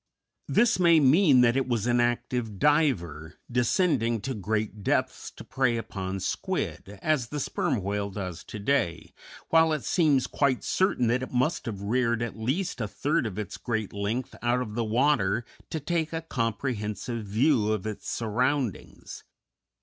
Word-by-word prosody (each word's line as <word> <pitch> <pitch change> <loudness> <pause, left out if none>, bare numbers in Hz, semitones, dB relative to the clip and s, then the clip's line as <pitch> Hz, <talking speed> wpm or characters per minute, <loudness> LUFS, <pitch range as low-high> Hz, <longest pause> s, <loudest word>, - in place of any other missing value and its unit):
This 240 -3 +3
may 170 -2 +6
mean 145 -1 +5
that 120 0 +4
it 135 -1 0
was 120 -4 0
an 120 0 +2
active 120 -2 -1
diver, 95 - +1 0.2
descending 120 - +2
to 135 +5 -3
great 105 0 -2
depths - - -1
to - - -10
prey 130 -3 0
upon 95 -4 -4
squid, 100 +2 -3
as 150 -7 +1
the 150 - -4
Sperm 120 -5 -1
Whale 100 +1 -2
does 95 -3 -6
to - - -7
day, 100 - -1 0.4
while 160 0 +5
it 150 - -2
seems 150 -7 +2
quite 135 -4 0
certain 185 -9 +1
that 125 +2 +1
it 130 - -5
must 130 +5 0
have 100 -3 -5
reared 115 +2 +1
at 120 - -4
least 130 - -2
a 105 - -1
third 145 +4 0
of 100 - -7
its 105 -2 -5
great 110 -4 -3
length 105 +5 -3
out 120 +1 +1
of 115 - -7
water 115 -1 +1 0.2
to 160 - -3
take 160 +1 -2
a 165 - -2
comprehensive 115 -3 -3
view 110 +1 +2
of 110 -3 -2
its 110 -1 -5
surroundings. 120 - -2
120 Hz, 160 wpm, -27 LUFS, 105-140 Hz, 0.4 s, may